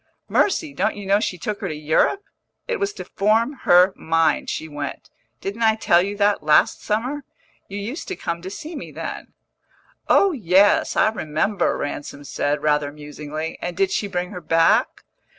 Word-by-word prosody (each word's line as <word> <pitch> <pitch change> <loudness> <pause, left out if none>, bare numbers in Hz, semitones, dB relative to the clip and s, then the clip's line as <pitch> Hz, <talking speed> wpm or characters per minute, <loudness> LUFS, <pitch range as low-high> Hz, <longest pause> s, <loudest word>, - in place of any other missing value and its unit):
"Mercy! 325 -7 +1
don't 215 - 0
you 205 - -7
know 200 +1 +3
she 185 -4 -2
took 210 +1 -4
her 195 - -2
to 155 - -4
Europe? 155 - +1 0.4
It 480 -3 -2
was 400 0 0
to - - -8
form 220 +6 +1 0.2
her 180 +2 +7
mind 165 -1 +1
she 160 - -4
went. 145 -2 -6 0.3
Didn't 200 +4 -5
I 220 -1 +4
tell 175 -5 +4
you 200 +2 -3
that 205 -2 +2
last 150 0 +3
summer? 250 +7 -2 0.4
You 200 - -6
used 230 - -5
to 380 - -4
come 170 - -4
to 185 - -6
see 320 - -8
me - - -7
then." - - -7 0.7
"Oh 395 - +5
yes, 200 - +3
I - - +4
remember," 185 0 -1
Ransom 145 0 -5
said, 145 +1 -2
rather 150 -1 +1
musingly. 150 +2 -6
"And 175 0 -4
did 195 -1 +2
she 205 - -1
bring 180 -2 -3
her 180 - -7
back?" 165 +1 +2
190 Hz, 180 wpm, -22 LUFS, 155-220 Hz, 0.7 s, her